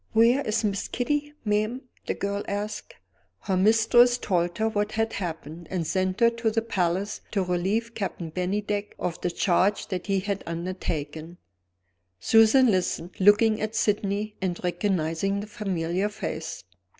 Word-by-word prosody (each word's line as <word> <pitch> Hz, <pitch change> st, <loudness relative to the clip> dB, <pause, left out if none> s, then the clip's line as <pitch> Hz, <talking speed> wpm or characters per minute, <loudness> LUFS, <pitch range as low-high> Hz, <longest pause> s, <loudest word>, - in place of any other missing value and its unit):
"Where 230 Hz, +5 st, +5 dB
is 215 Hz, +1 st, 0 dB
Miss 200 Hz, -2 st, -1 dB
Kitty, 295 Hz, +4 st, -1 dB
ma'am?" 215 Hz, +4 st, 0 dB, 0.3 s
the -, -, -1 dB
girl 200 Hz, 0 st, -2 dB
asked. 205 Hz, +1 st, -4 dB, 0.5 s
Her 190 Hz, -, -1 dB
mistress 225 Hz, +5 st, +5 dB
told 175 Hz, -6 st, -1 dB
her 220 Hz, -, +1 dB
what 210 Hz, -1 st, -1 dB
had 225 Hz, 0 st, 0 dB
happened, 165 Hz, -2 st, -5 dB
and 180 Hz, -3 st, -2 dB
sent 185 Hz, +4 st, -1 dB
her 235 Hz, 0 st, +6 dB
to 230 Hz, -1 st, -1 dB
the 225 Hz, +1 st, 0 dB
Palace 190 Hz, -2 st, -1 dB
to 195 Hz, -3 st, +1 dB
relieve 190 Hz, +6 st, -1 dB
Captain 180 Hz, -6 st, -4 dB
Bennydeck 205 Hz, +4 st, -2 dB
of 170 Hz, -1 st, -4 dB
the 180 Hz, -, 0 dB
charge 185 Hz, +3 st, +1 dB
that 185 Hz, -1 st, -4 dB
he 195 Hz, -1 st, +1 dB
had 200 Hz, 0 st, -3 dB
undertaken. 170 Hz, -2 st, -4 dB, 0.8 s
Susan 225 Hz, -, +5 dB
listened, 180 Hz, -2 st, -1 dB
looking 210 Hz, +3 st, +5 dB
at 215 Hz, +1 st, -3 dB
Sydney 210 Hz, 0 st, 0 dB
and 180 Hz, -2 st, -2 dB
recognizing 180 Hz, +1 st, 0 dB
the 205 Hz, -, -5 dB
familiar 190 Hz, -2 st, -2 dB
face. 160 Hz, -6 st, -5 dB
200 Hz, 150 wpm, -26 LUFS, 180-220 Hz, 0.8 s, her